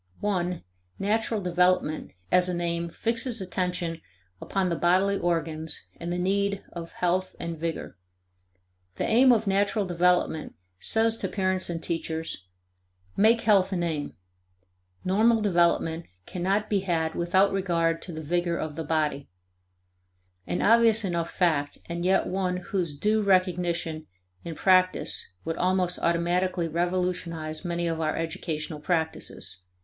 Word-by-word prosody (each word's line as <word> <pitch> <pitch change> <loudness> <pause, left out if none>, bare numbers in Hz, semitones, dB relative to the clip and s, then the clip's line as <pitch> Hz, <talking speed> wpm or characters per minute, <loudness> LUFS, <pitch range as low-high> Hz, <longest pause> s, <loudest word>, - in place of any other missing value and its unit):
(1) 180 -4 -1 0.3
Natural 220 +2 0
development 180 - +1 0.2
as 180 0 +5
an 175 -1 -1
aim 170 0 -1
fixes 230 +6 -1
attention 180 -3 -2 0.4
upon 195 -1 -1
the 170 - 0
bodily 185 +4 +3
organs 160 -2 -2
and 170 +1 -5
the 175 - -1
need 200 +2 0
of 170 -1 -7
health 185 +1 0
and 170 -1 -5
vigor. 165 0 -4 1.0
The - - -2
aim 250 +3 +5
of 225 -2 +3
natural 200 +1 +1
development 175 -2 +1 0.2
says 225 - +2
to - - -2
parents 185 -2 0
and 165 -1 -4
teachers: 160 - -3 0.7
Make 225 +3 +4
health 200 -3 +4
an 175 -2 -1
aim; 150 - -3 0.9
normal 220 +5 +4
development 170 -4 +1 0.2
cannot 195 +4 -1
be 205 -2 +1
had 165 -4 -1
without 185 +4 +3
regard 170 -4 0
to 180 - -7
the 160 -1 -6
vigor 175 +2 0
of 155 -2 -4
the 160 - -3
body 150 -2 -1 1.2
an - - -1
obvious 225 -1 +5
enough 170 -2 -1
fact 145 -5 0
and 170 0 -4
yet 190 +1 +3
one 185 -1 -1
whose 180 -5 -3
due 215 +6 +2
recognition 175 -4 +1 0.4
in 165 -1 -6
practice 185 +2 +2 0.2
would 165 0 -2
almost 180 -1 +1
automatically 175 +1 +1
revolutionize 170 -2 -2
many 170 -1 -2
of 165 -1 -1
our 155 -1 0
educational 160 -2 -4
practices. 160 - -2
175 Hz, 135 wpm, -27 LUFS, 165-190 Hz, 1.2 s, as